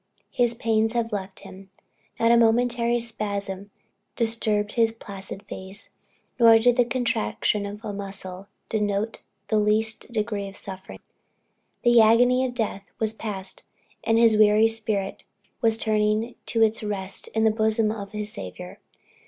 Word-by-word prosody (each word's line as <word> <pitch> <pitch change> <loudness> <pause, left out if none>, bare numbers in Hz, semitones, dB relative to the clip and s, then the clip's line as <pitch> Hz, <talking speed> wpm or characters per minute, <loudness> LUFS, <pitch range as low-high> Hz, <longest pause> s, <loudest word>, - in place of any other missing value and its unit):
his 240 -1 +1
pains 225 -1 +1
had 235 -1 -1
left 195 -2 -5
him, 195 0 -12 0.5
not 230 0 +4
a - - +7
momentary 235 +1 +3
spasm 200 -3 -4 0.5
disturbed 220 -2 0
his 230 -1 +2
placid 200 -3 -9
face, 195 +1 -9 0.5
nor 230 -1 +8
did 240 +2 +4
the 245 - +5
contraction 215 - -1
of 210 +3 -8
a 210 - -4
muscle 195 -1 -7 0.2
denote 210 0 -1 0.3
the 215 - +3
least 220 +2 0
degree 210 -3 -2
of 195 - -11
suffering; 190 0 -9 0.9
the 240 -1 +6
agony 245 +3 +5
of 250 -1 -3
death 205 -4 -3
was 220 -1 -1
passed, 205 -4 -6 0.4
and 225 - +2
his 230 -1 +5
wearied 215 +1 +5
spirit 215 -3 -3 0.4
was 225 -1 +2
turning 215 +1 +1
to 225 -1 +2
its 220 +1 +1
rest 195 -3 -4
in 220 - +2
the 220 - +5
bosom 220 0 +1
of 200 -2 -6
his 210 0 -5
Saviour. 90 -1 -8
215 Hz, 145 wpm, -25 LUFS, 200-230 Hz, 0.9 s, nor